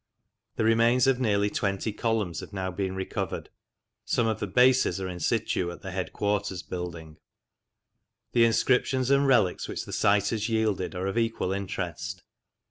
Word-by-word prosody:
The - - 0
remains 115 +2 +4
of 135 -1 +3
nearly 105 -4 +1
twenty 100 +1 -1
columns 105 -8 -1
have - - -9
now 95 -2 -3
been 95 +1 -3
recovered. 95 0 -4 0.5
Some 120 - +1
of 110 -1 0
the 105 - -2
bases 125 -3 +4
are 95 - -3
in 90 -1 -6
situ 90 0 0
in 85 - -7
the 95 - -8
headquarters 100 0 -2
building. 85 -3 -7 1.1
The 115 -1 +5
inscriptions 130 +2 +2
and 140 0 +4
relics 110 -9 +2
which - - -5
the - - -8
site 100 0 +3
has 110 0 -2
yielded 110 -5 0
are 90 +1 -3
of 95 +4 0
equal 115 -5 -1
interest. 95 -1 -4
100 Hz, 160 wpm, -27 LUFS, 95-115 Hz, 1.1 s, The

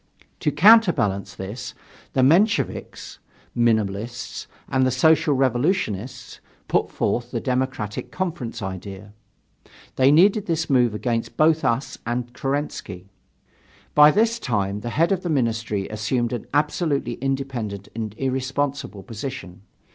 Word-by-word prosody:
To - - 0
counterbalance 170 - +4
this, 100 +6 -7 0.4
the 130 - +2
Mensheviks 180 - +1 0.4
(Minimalists) 115 0 -1 0.2
and 130 -1 +1
the 130 - +3
Social 155 +3 +3
Revolutionists 130 - -1 0.3
put - - +1
forth 120 0 -1
the 120 - -3
Democratic 125 -4 -2
Conference 160 - -4
idea. 95 +2 -7 0.8
They 130 +1 +5
needed 195 +7 +4
this 160 -2 -1
move 120 -4 +3
against 115 0 -2
both 155 0 +3
us 130 +1 -1
and 120 +1 -3
Kerensky. 135 -10 -4 0.8
By 150 0 +8
this 225 +6 +2
time 100 - -1
the 120 - -5
head 165 +9 +1
of 190 -2 +1
the 175 - -4
Ministry 115 -7 -1
assumed 115 +3 -1
an 120 - -5
absolutely 145 -3 0
independent 130 -7 -3
and 110 -2 -5
irresponsible 135 -4 -2
position. 115 -6 -7
125 Hz, 120 wpm, -23 LUFS, 110-145 Hz, 0.8 s, By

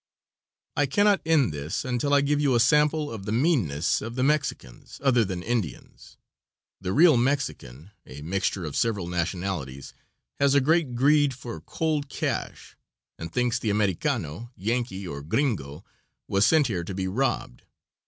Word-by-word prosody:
I 145 -1 +2
cannot 205 +7 +3
end 145 - +3
this 75 +2 -4
until 130 +3 -1
I 145 0 +5
give 145 +1 +1
you 140 -4 +2
a - - +4
sample 150 +5 +3
of 105 -4 -7
the - - -2
meanness 110 - +1
of 115 +2 -6
the 130 - 0
Mexicans, 140 - -2
other 125 -4 +4
than 90 -3 -4
Indians. 115 -7 -4 0.6
The 95 -1 -3
real 155 - +6
Mexican 120 - -2 0.2
a 75 +3 -10
mixture 95 +1 -1
of 75 - -5
several 105 -6 0
nationalities 85 -5 -4 0.5
has 140 0 +3
a - - +7
great 150 -2 +1
greed 145 +1 +3
for 120 -9 -8
cold 150 - -2
cash, - - -4 0.4
and 80 0 -6
thinks 125 +4 0
the 110 - -2
Americano, 105 -1 -1
Yankee, 110 -2 -2
or 70 -3 -6
gringo, 80 - -2 0.4
was 100 +1 +3
sent 160 -2 +4
here 95 -8 -2
to 95 +2 -6
be 95 -1 -2
robbed. 115 - -2
115 Hz, 155 wpm, -26 LUFS, 90-140 Hz, 0.6 s, a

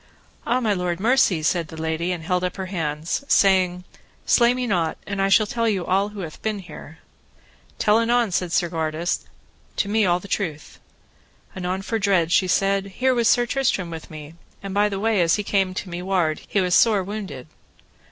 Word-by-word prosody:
Ah, 245 +2 +2
my 220 -4 +1
lord, 180 -2 -2
mercy, 215 -7 +2
said 165 +1 0
the 160 +1 -10
lady, 160 +2 -2
and 175 -3 -4
held 180 +2 0
up 180 - -2
her 190 - -4
hands, 165 - -3
saying: 185 -4 +3 0.4
Slay 235 -1 +4
me 250 0 -2
not, 175 -8 0
and 200 -1 -3
I 195 - +2
shall 215 +2 +5
tell 230 +2 -1
you 190 -5 -1
all 195 +2 +1
who 210 -1 -8
hath 160 -3 -8
been 215 -1 -2
here. 170 -4 -11 0.8
Tell 210 +1 +3
anon, 235 -2 +2
said 180 -1 -1
Segwarides, 165 -1 -1 0.5
to - - 0
me 215 +2 +2
all 175 -2 +2
the 200 - -11
truth. 160 -7 -4 0.8
Anon 185 +1 -3
for 225 +2 -2
dread 190 -5 +2
she 185 +1 +3
said: 195 +1 +1
Here 260 0 +2
was 235 -2 +2
Sir 240 - +3
Tristram 235 -9 -1
with 160 -1 -8
me, 155 0 -10 0.3
and 195 -1 -5
by 205 +1 +2
the 195 -1 -4
way 215 -2 +2
as 165 -1 +3
he 210 - -2
came 195 -2 0
to 195 - -4
me 175 +1 -4
ward, 180 -5 0
he 200 - +1
was 180 -1 0
sore 210 -3 +4
wounded. 190 -10 -6
190 Hz, 200 wpm, -23 LUFS, 170-210 Hz, 0.8 s, shall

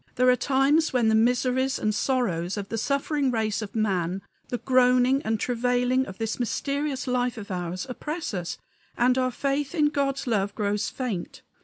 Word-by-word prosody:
There 255 0 +4
are - - +4
times 280 +5 +2
when 240 -3 +2
the - - +3
miseries 250 +4 +2
and 215 - 0
sorrows 205 -8 0
of 200 -1 -5
the 225 - -3
suffering 280 +2 0
race 220 -3 0
of 210 0 -7
man, 190 -4 0 0.2
the 245 - -2
groaning 255 +1 +3
and 220 -3 -1
travailing 250 +2 +1
of 190 - -9
this 225 +1 -3
mysterious 275 +2 -2
life 250 -2 0
of 200 -2 -7
ours, 180 +3 -3
oppress 300 +3 -4
us, 175 -3 -3 0.4
and 250 +1 +3
our 255 0 +2
faith 275 +4 -2
in 300 -2 +3
God's 275 -2 -1
love 205 -4 0
grows 210 -1 -1
faint. 225 -10 -5
250 Hz, 175 wpm, -26 LUFS, 215-265 Hz, 0.4 s, There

